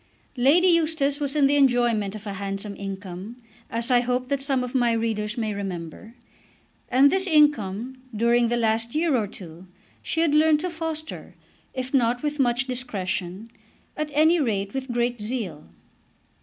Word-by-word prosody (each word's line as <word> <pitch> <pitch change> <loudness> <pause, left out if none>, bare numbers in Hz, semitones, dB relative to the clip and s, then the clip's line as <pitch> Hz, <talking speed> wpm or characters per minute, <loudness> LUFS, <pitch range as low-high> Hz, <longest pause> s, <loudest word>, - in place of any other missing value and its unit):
Lady 290 +9 +4
Eustace 315 -4 +2
was 285 0 -2
in 290 -2 +4
the 285 +1 +3
enjoyment 240 -6 +2
of 215 0 -9
a 200 - -4
handsome 195 +1 -5
income, 195 +3 -7 0.3
as 230 +2 0
I 245 - +6
hope 250 +1 -1
that 280 -1 0
some 270 -2 0
of 250 - -6
my 240 -3 +2
readers 225 -1 -2
may 220 -2 -1
remember, 195 +2 -6 0.7
and 270 +3 +5
this 380 0 +1
income, 255 - +2
during 235 +2 +2
the 240 +1 0
last 230 +1 0
year 315 -2 +2
or 220 -4 0
two, 180 -2 -11 0.3
she 325 - -1
had 325 -3 +2
learned 305 0 +4
to 360 0 -3
foster, 320 -1 -6 0.4
if 255 0 -4
not 245 -1 +2
with 295 0 -2
much 245 0 +2
discretion, 205 -5 -4 0.4
at 305 0 -3
any 315 +4 +4
rate 200 -8 -1
with 265 -1 -4
great 240 -1 -1
zeal. 210 - -4
245 Hz, 165 wpm, -24 LUFS, 210-280 Hz, 0.7 s, I